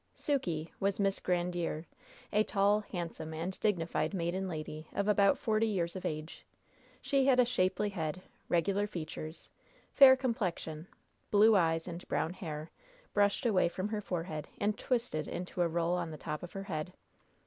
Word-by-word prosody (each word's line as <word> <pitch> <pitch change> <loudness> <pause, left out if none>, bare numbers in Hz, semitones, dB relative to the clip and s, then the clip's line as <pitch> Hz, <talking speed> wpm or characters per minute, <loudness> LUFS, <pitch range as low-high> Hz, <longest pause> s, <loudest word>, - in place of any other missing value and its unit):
"Sukey" 175 - -1
was 195 0 0
Miss 195 -1 +1
Grandiere, 175 -2 -1 0.5
a 210 +1 +5
tall, 205 0 +3
handsome 170 -5 -5
and 175 +4 -4
dignified 185 -2 0
maiden 185 +2 -1
lady 155 -2 -5
of 200 - 0
about 200 -1 +4
forty 220 0 +1
years 175 -5 -1
of 185 - -5
age. 155 +1 -6 0.6
She 275 -2 +2
had 255 -2 +5
a 250 - +7
shapely 205 -3 +1
head, 180 -2 -3 0.3
regular 195 +4 +2
features, 160 -3 -7 0.4
fair 270 -2 +9
complexion, 185 - -2 0.4
blue 215 +1 +6
eyes 165 -3 +2
and 175 0 -7
brown 165 - 0
hair, 155 -3 -6 0.4
brushed 205 +5 +2
away 190 -6 +3
from 185 +4 -3
her 210 -1 -2
forehead, 165 -5 -4
and 210 +1 +1
twisted 230 -11 -1
into 180 0 -4
a 175 - +4
roll 170 +1 0
on 180 -2 -1
the 155 - -7
top 150 0 -4
of 175 - -8
her 195 - -4
head. 180 -2 -4
180 Hz, 160 wpm, -32 LUFS, 165-205 Hz, 0.6 s, fair